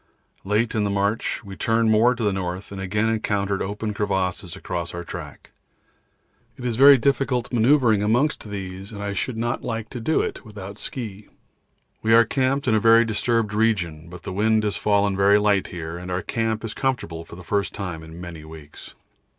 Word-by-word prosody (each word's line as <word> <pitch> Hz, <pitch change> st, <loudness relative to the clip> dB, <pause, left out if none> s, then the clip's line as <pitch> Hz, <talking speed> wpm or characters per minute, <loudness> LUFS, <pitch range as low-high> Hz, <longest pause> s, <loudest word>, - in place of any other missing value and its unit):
Late 105 Hz, +4 st, +1 dB
in 110 Hz, -, +1 dB
the 100 Hz, -, 0 dB
march 100 Hz, +4 st, -1 dB
we 100 Hz, -2 st, -9 dB
turned 115 Hz, +1 st, +2 dB
more 115 Hz, +3 st, +4 dB
to 115 Hz, -, -4 dB
the 105 Hz, -2 st, +2 dB
north 95 Hz, 0 st, -4 dB
and 100 Hz, -1 st, -6 dB
again 105 Hz, +3 st, 0 dB
encountered 100 Hz, -3 st, 0 dB
open 105 Hz, +2 st, -3 dB
crevasses 95 Hz, -3 st, -2 dB
across 85 Hz, 0 st, -4 dB
our 85 Hz, -, -5 dB
track. 85 Hz, -4 st, -9 dB, 1.1 s
It 125 Hz, -, -7 dB
is 120 Hz, -2 st, 0 dB
very 140 Hz, +3 st, +8 dB
difficult 130 Hz, -1 st, 0 dB
manoeuvring 120 Hz, -3 st, +4 dB
amongst 115 Hz, +3 st, +1 dB
these 95 Hz, 0 st, -6 dB
and 100 Hz, -2 st, -6 dB
I 100 Hz, 0 st, -2 dB
should 100 Hz, +4 st, -2 dB
not 120 Hz, +1 st, -1 dB
like 115 Hz, -1 st, -4 dB
to 125 Hz, -, -5 dB
do 155 Hz, +7 st, +1 dB
it -, -, -4 dB
without 100 Hz, -1 st, -9 dB
ski. 105 Hz, -5 st, -5 dB, 0.7 s
We 110 Hz, +1 st, +4 dB
are 115 Hz, 0 st, +7 dB
camped 130 Hz, +3 st, 0 dB
in 115 Hz, -, +3 dB
a 110 Hz, -, +4 dB
very 115 Hz, +2 st, +6 dB
disturbed 115 Hz, 0 st, 0 dB
region, 90 Hz, -8 st, 0 dB
but 90 Hz, 0 st, -11 dB
the -, -, -5 dB
wind 110 Hz, +2 st, +2 dB
has 105 Hz, -1 st, 0 dB
fallen 100 Hz, -1 st, +2 dB
very 100 Hz, +1 st, +5 dB
light 105 Hz, -2 st, +2 dB
here, 85 Hz, -1 st, -6 dB
and 90 Hz, +1 st, -8 dB
our 90 Hz, 0 st, -2 dB
camp 115 Hz, -1 st, -1 dB
is 110 Hz, -, -4 dB
comfortable 120 Hz, -12 st, -2 dB
for 80 Hz, -, -12 dB
the 90 Hz, -, -11 dB
first 100 Hz, +1 st, -1 dB
time 90 Hz, -5 st, -5 dB
for 80 Hz, -, -11 dB
many 85 Hz, -1 st, -9 dB
weeks. 80 Hz, -2 st, -12 dB
105 Hz, 195 wpm, -23 LUFS, 95-115 Hz, 1.1 s, very